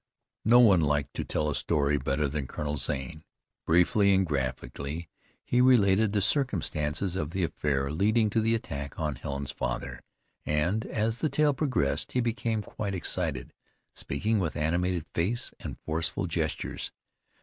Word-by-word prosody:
No 120 Hz, +3 st, +7 dB
one 100 Hz, -8 st, +6 dB
liked 75 Hz, -3 st, 0 dB
to -, -, -3 dB
tell 75 Hz, -, -1 dB
a 75 Hz, -, 0 dB
story 70 Hz, 0 st, +1 dB
better 70 Hz, +2 st, 0 dB
than 70 Hz, -1 st, -3 dB
Colonel 75 Hz, +1 st, -3 dB
Zane. 70 Hz, +4 st, -3 dB, 0.4 s
Briefly 95 Hz, +4 st, +4 dB
and 95 Hz, 0 st, +3 dB
graphically 70 Hz, +2 st, -3 dB, 0.3 s
he 125 Hz, -, +2 dB
related 110 Hz, -5 st, +5 dB
the 105 Hz, -1 st, +1 dB
circumstances 95 Hz, -, 0 dB
of 75 Hz, -5 st, -2 dB
the 90 Hz, +2 st, -1 dB
affair 70 Hz, -3 st, -1 dB
leading 105 Hz, +6 st, +2 dB
to 115 Hz, -, +2 dB
the 115 Hz, +1 st, +2 dB
attack 70 Hz, -10 st, -5 dB
on 75 Hz, -2 st, -1 dB
Helen's 70 Hz, +2 st, -4 dB
father, -, -, -4 dB, 0.4 s
and, 85 Hz, +9 st, 0 dB
as 110 Hz, +2 st, -1 dB
the 155 Hz, -, +1 dB
tale 150 Hz, 0 st, +3 dB
progressed, 125 Hz, -, 0 dB
he 125 Hz, -, +2 dB
became 115 Hz, -2 st, -1 dB
quite 100 Hz, -1 st, -4 dB
excited, 80 Hz, -8 st, -2 dB, 0.4 s
speaking 105 Hz, +10 st, -1 dB
with 85 Hz, -5 st, -2 dB
animated 85 Hz, +2 st, 0 dB
face 105 Hz, +9 st, 0 dB
and -, -, -6 dB
forceful 80 Hz, +1 st, -2 dB
gestures. -, -, -3 dB
85 Hz, 150 wpm, -28 LUFS, 75-110 Hz, 0.4 s, No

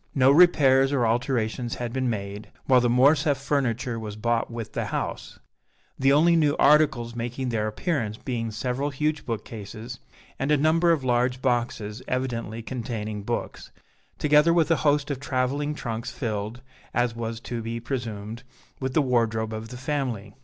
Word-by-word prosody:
No 135 Hz, -1 st, +5 dB
repairs 140 Hz, -5 st, +5 dB
or 130 Hz, -4 st, +2 dB
alterations 120 Hz, 0 st, -1 dB
had 120 Hz, -1 st, -4 dB
been 130 Hz, -1 st, 0 dB
made, 100 Hz, -1 st, -5 dB, 0.2 s
while 130 Hz, -2 st, +5 dB
the 120 Hz, -, +2 dB
Morcerf 140 Hz, +4 st, +4 dB
furniture 130 Hz, -4 st, -1 dB
was 105 Hz, -2 st, -6 dB
bought 115 Hz, +2 st, 0 dB
with 115 Hz, -2 st, -6 dB
the -, -, -2 dB
house, -, -, -4 dB, 0.6 s
the 135 Hz, +1 st, +4 dB
only 165 Hz, +4 st, +5 dB
new 150 Hz, -3 st, +2 dB
articles 140 Hz, -6 st, +3 dB
making 120 Hz, +2 st, -3 dB
their 110 Hz, -2 st, 0 dB
appearance 110 Hz, -, -2 dB
being 115 Hz, -3 st, -3 dB
several 125 Hz, +6 st, -2 dB
huge 150 Hz, +2 st, -2 dB
bookcases 115 Hz, +1 st, -6 dB, 0.4 s
and 135 Hz, -, -1 dB
a 150 Hz, -, +4 dB
number 165 Hz, +4 st, +3 dB
of 155 Hz, -5 st, +1 dB
large 125 Hz, 0 st, +1 dB
boxes 120 Hz, -3 st, -1 dB
evidently 115 Hz, -3 st, -3 dB
containing 110 Hz, -4 st, -4 dB
books, -, -, -4 dB, 0.5 s
together 150 Hz, +3 st, +4 dB
with 165 Hz, -2 st, +3 dB
a 165 Hz, -, +4 dB
host 145 Hz, +1 st, +1 dB
of 135 Hz, -, -3 dB
traveling 145 Hz, +2 st, -1 dB
trunks 115 Hz, -5 st, -4 dB
filled, 110 Hz, -1 st, -4 dB, 0.3 s
as 120 Hz, -1 st, +1 dB
was 115 Hz, -1 st, -4 dB
to 120 Hz, -1 st, -4 dB
be 115 Hz, +1 st, -4 dB
presumed, 115 Hz, -3 st, -5 dB, 0.4 s
with 130 Hz, -1 st, -3 dB
the 155 Hz, -, +4 dB
wardrobe 115 Hz, -3 st, 0 dB
of 110 Hz, +1 st, -5 dB
the 125 Hz, -, -8 dB
family. 125 Hz, -7 st, -3 dB
125 Hz, 160 wpm, -25 LUFS, 115-140 Hz, 0.6 s, No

